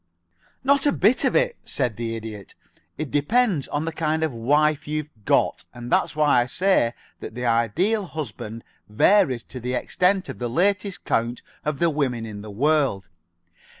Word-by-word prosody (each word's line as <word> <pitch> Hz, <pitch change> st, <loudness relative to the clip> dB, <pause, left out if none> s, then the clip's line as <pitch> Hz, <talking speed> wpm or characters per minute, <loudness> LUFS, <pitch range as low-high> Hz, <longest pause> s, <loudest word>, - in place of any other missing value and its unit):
"Not 280 Hz, +1 st, +3 dB
a -, -, +4 dB
bit 225 Hz, +1 st, +3 dB
of -, -, +1 dB
it," -, -, +2 dB
said 120 Hz, -4 st, -2 dB
the 115 Hz, 0 st, -3 dB
Idiot. 110 Hz, -3 st, -8 dB, 0.4 s
"It 155 Hz, -3 st, -4 dB
depends 185 Hz, -, +2 dB
on 150 Hz, +2 st, -2 dB
the 165 Hz, -, -2 dB
kind 160 Hz, 0 st, -1 dB
of 155 Hz, -4 st, -1 dB
wife 145 Hz, +6 st, +1 dB
you've 150 Hz, 0 st, -3 dB
got, -, -, +2 dB
and 120 Hz, 0 st, -8 dB
that's -, -, +2 dB
why 150 Hz, -5 st, +4 dB
I 120 Hz, -, -2 dB
say 155 Hz, -6 st, +2 dB, 0.2 s
that -, -, -8 dB
the 125 Hz, 0 st, -4 dB
Ideal 160 Hz, -, +1 dB
Husband 115 Hz, -7 st, -6 dB, 0.3 s
varies 130 Hz, -, +3 dB
to 130 Hz, -, -9 dB
the 125 Hz, +1 st, -3 dB
extent 185 Hz, +8 st, +1 dB
of -, -, -7 dB
the 120 Hz, -1 st, -2 dB
latest 195 Hz, -, 0 dB
count 115 Hz, +2 st, -1 dB, 0.2 s
of 150 Hz, -2 st, -2 dB
the 170 Hz, +2 st, +2 dB
women 130 Hz, -6 st, -1 dB
in 105 Hz, -2 st, -7 dB
the 105 Hz, -, -9 dB
world. 130 Hz, -, +1 dB
145 Hz, 175 wpm, -23 LUFS, 120-175 Hz, 0.4 s, a